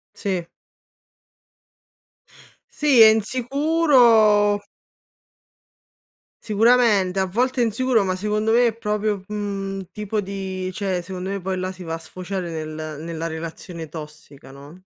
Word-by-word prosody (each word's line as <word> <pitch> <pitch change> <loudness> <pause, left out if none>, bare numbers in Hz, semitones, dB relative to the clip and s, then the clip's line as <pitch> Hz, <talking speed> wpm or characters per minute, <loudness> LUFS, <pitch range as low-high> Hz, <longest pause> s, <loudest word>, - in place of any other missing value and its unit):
Sì. 185 -5 -3 2.2
Sì, 290 -5 +3
è 220 - +11
insicuro 235 -3 +3 1.8
Sicuramente, 215 -4 +3
a 190 - +2
volte 250 +7 0
è - - +4
insicuro, 230 0 +1
ma 185 -1 -1
secondo 210 +3 -1
me 240 +1 +5
è 225 - -2
proprio 210 -2 -2
mhmm, 200 -2 -4
un 190 - -6
tipo 210 +1 -3
di 190 -1 -5
cioè 190 -3 -2
secondo 185 +1 -6
me 200 - -4
poi 185 +1 -3
là 185 +1 -3
si 185 -1 -11
va 165 -1 -4
a - - -5
sfociare 180 +1 -6
nel 155 -1 -6
nella 165 0 -5
relazione 165 0 -7
tossica, 150 -3 -11
no? 145 +6 -13
195 Hz, 130 wpm, -22 LUFS, 180-220 Hz, 2.2 s, è